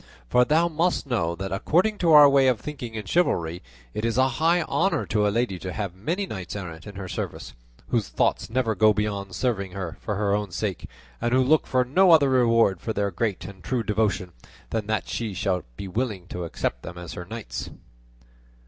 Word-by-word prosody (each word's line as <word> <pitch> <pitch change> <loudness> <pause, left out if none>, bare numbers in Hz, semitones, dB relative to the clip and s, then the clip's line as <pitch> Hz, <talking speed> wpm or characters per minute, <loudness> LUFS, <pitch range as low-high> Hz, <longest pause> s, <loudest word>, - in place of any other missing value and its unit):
For 125 0 +4
thou 160 +5 +3
must 170 +1 0
know 95 -11 -1
that 95 +2 -5
according 180 - +1
to 170 -2 +3
our 150 -1 +10
way 140 -1 +4
of 125 -4 +2
thinking 125 -7 -7
in 110 -2 -5
chivalry, 90 - 0 0.3
it 105 - -4
is 115 +1 0
a 130 0 +4
high 170 +1 +4
honour 195 +4 0
to 105 -1 +1
a - - +3
lady 105 -3 -1
to 95 - -5
have 100 -5 -3
many 165 - -2
knights 95 - -6
errant 85 -3 -7
in 100 - -9
her 95 -1 -6
service, - - -5 0.4
whose - - 0
thoughts - - 0
never 115 -1 0
go 110 +1 +4
beyond 100 -3 -2
serving 100 -5 -1
her 90 -4 -5
for 105 - -3
her 100 0 0
own 105 -1 -1
sake, 95 +1 -4 0.3
and 120 +1 +1
who 130 - +4
look 155 +4 +3
for 130 -1 +2
no 185 +9 +4
other 150 -5 +6
reward 115 -7 +3
for 110 - -3
their 100 -1 -1
great 95 -1 -2
and 95 -1 -10
true 120 +6 -1
devotion 105 -4 0 0.4
than 110 -2 -2
that 110 -1 -1
she 110 -5 -3
should 95 -1 -1
be 100 - -6
willing 105 -2 -3
to 90 -1 -4
accept 85 - -3
them 90 -1 -9
as 85 -1 -7
her 90 - -7
knights." 110 +3 -6
110 Hz, 210 wpm, -25 LUFS, 95-130 Hz, 0.4 s, our